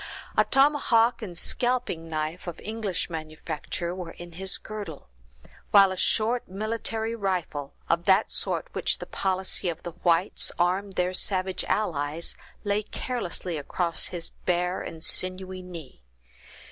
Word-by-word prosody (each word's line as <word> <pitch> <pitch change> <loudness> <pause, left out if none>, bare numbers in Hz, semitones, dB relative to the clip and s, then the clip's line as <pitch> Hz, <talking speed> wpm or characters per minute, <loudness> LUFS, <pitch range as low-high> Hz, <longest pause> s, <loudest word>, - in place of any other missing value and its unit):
A - - +6
tomahawk 270 -5 +4
and 180 -6 -4
scalping 240 -9 0
knife, 155 +3 -3
of 170 - -5
English 215 -4 -2
manufacture, 160 +1 -4
were 180 -2 -6
in 175 0 -10
his 190 +3 0
girdle; 205 - -7 0.6
while 195 -2 +8
a - - -2
short 225 +5 +2
military 220 +3 -1
rifle, 180 -9 -2
of 170 +1 +2
that 195 +2 +5
sort - - +1
with - - -34
which - - +1
the - - -6
policy 190 -1 0
of 165 -1 -5
the 175 - -4
whites 175 +2 +2
armed 185 +3 +1
their 180 0 +1
savage 185 0 +1
allies, 160 -5 0 0.3
lay 205 0 +1
carelessly 185 -8 -3
across 170 +4 0
his 170 -2 -2 0.2
bare 180 0 +1
and 160 -1 -7
sinewy 185 0 -1
knee. 170 - -9
185 Hz, 140 wpm, -27 LUFS, 170-205 Hz, 0.6 s, while